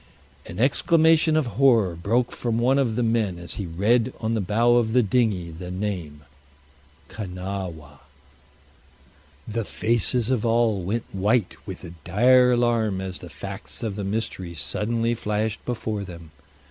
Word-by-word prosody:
An 85 - -8
exclamation 160 +4 +4
of 155 - +2 0.2
horror 115 -10 +4
broke 115 +9 0
from 115 -2 -2
one 130 +4 +3
of 120 -5 0
the 125 - 0
men 110 -5 0
as 85 0 -7
he 95 - -4
read 110 +9 +1
on 110 0 -1
the 110 - 0
bow 115 +5 +3
of 110 -2 +1
the 125 -1 +4
dinghy 100 -6 0
the 90 +3 -8
name, 90 -6 -4 0.8
Kanawha. 90 -7 -6 1.5
The 115 +1 -2
faces 115 +3 +1
of 125 -5 0
all 115 -3 +2
went 110 +6 -2
white 105 +2 +1
with 95 -2 -7
a 85 -2 -9
dire 125 +7 +5
alarm 115 -5 +1
as 95 -1 -5
the - - -10
facts - - -6
of 110 -4 -3
the 100 - -4
mystery 95 -4 -4
suddenly 115 - 0
flashed 105 -1 -2
before 110 -4 -3
them. 85 -4 -11
110 Hz, 150 wpm, -24 LUFS, 95-120 Hz, 1.5 s, dire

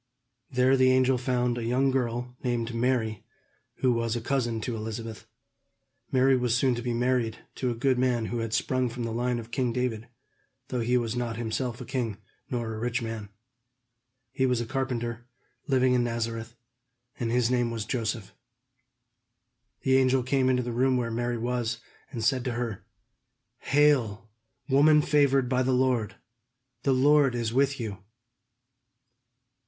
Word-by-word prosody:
There 130 0 +3
the 130 -1 +4
angel 130 0 +3
found 125 -1 0
a - - -4
young 130 +4 +2
girl 125 -1 -2
named 120 -2 -1
Mary, 115 -3 0 0.6
who 130 -2 +4
was 115 0 -1
a - - -1
cousin 120 -2 -1
to 120 +1 -3
Elizabeth. 110 0 -6 0.8
Mary 130 +1 +4
was 125 -2 +1
soon 130 0 +3
to 120 - -3
be 120 0 -2
married 120 -1 0 0.2
to 130 - -1
a 120 - -2
good 125 +1 +1
man 125 -3 +1
who 120 +1 -3
had 115 -1 -3
sprung 130 +2 0
from 120 +1 -5
the 115 - -3
line 120 +2 0
of 115 0 -8
king 125 0 0
David, 115 -2 -2 0.6
though 125 - -2
he 120 +2 +2
was 120 -1 -1
not 120 -2 -2
himself 120 +1 -3
a 125 - -7
king, 115 -5 -2 0.3
nor 120 -3 -2
a 110 - -5
rich 120 +2 -1
man. 110 -3 -5 1.0
He 130 -1 +1
was 125 -2 +1
a 120 - -2
carpenter, 120 -2 -3 0.4
living 130 -2 +3
in 125 -1 +3
Nazareth, 115 -1 -3 0.6
and 115 - -1
his 120 0 +2
name 120 -2 +2
was 115 -2 -4
Joseph. 115 -4 -3 1.5
The 130 0 +3
angel 130 -1 +3
came 130 0 +2
into 125 -1 +2
the 120 - -4
room 130 +2 +2
where 120 -2 -1
Mary 120 +1 -1
was, 120 0 -1 0.3
and 115 -5 -5
said 130 +1 +2
to 125 - -1
her: 115 -4 -4 0.7
"Hail, 120 -7 +2 0.4
woman 150 +2 +5
favored 140 -3 +3
by 130 0 +1
the 130 0 +1
Lord; 125 -5 +1 0.7
the 135 - +1
Lord 140 0 +4
is 115 -1 -2
with 135 +1 +2
you!" 105 -5 -4
125 Hz, 165 wpm, -27 LUFS, 115-130 Hz, 1.5 s, woman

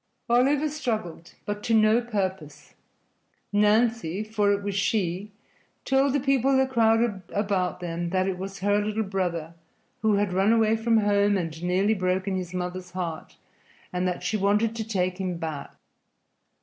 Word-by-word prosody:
Oliver 275 +5 +3
struggled, 220 - -4
but 205 0 -4
to 225 +1 +1
no 215 +2 +4
purpose. 190 -9 -4 0.8
Nancy 210 -3 +2
(for 215 -1 +1
it 200 0 0
was 200 0 -2
she) 200 -1 -1 0.5
told 270 0 +2
the 285 - +2
people 270 0 +2
that 265 0 +1
crowded 225 -3 +2
about 195 -3 -1
them 170 0 -3
that 185 +1 +1
it 185 -2 -2
was 195 0 -6
her 205 +1 +2
little 215 +1 -1
brother, 175 -5 -3 0.5
who 215 -1 +3
had 200 -2 0
run 195 +3 +3
away 225 -1 +3
from 225 0 +2
home 205 -1 +3
and 165 -3 -4
nearly 185 +4 +2
broken 185 0 -1
his 180 -2 -4
mother's 180 0 -4
heart, 175 -3 -5 0.6
and 180 0 0
that 180 - -3
she 215 - 0
wanted 210 +3 +1
to 225 - -3
take 185 -4 -1
him 185 -2 -2
back. 155 -4 -5
200 Hz, 160 wpm, -26 LUFS, 185-220 Hz, 0.8 s, no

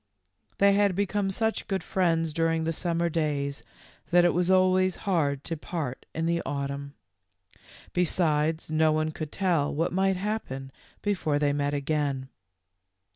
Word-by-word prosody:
They 200 0 +5
had 200 -2 +3
become 200 0 0
such 220 +3 -1
good 195 -2 -1
friends 165 -4 +1
during 165 0 +1
the 165 +1 -1
summer 170 +1 0
days 150 -3 -1 0.5
that 175 0 +5
it 175 - +4
was 180 +1 +1
always 185 0 +4
hard 145 -8 +1
to 165 - -3
part 150 -5 -5
in 160 +1 -1
the 170 0 +1
autumn; 140 0 -4 1.0
besides, 160 -3 +1
no 155 0 +3
one 155 0 0
could 155 -1 -6
tell 175 -7 +1
what 165 +4 -1
might 190 +1 +2
happen 180 -10 -4 0.3
before 180 -8 0
they 145 -1 +2
met 145 0 0
again. 140 -2 -1
165 Hz, 145 wpm, -27 LUFS, 145-185 Hz, 1.0 s, They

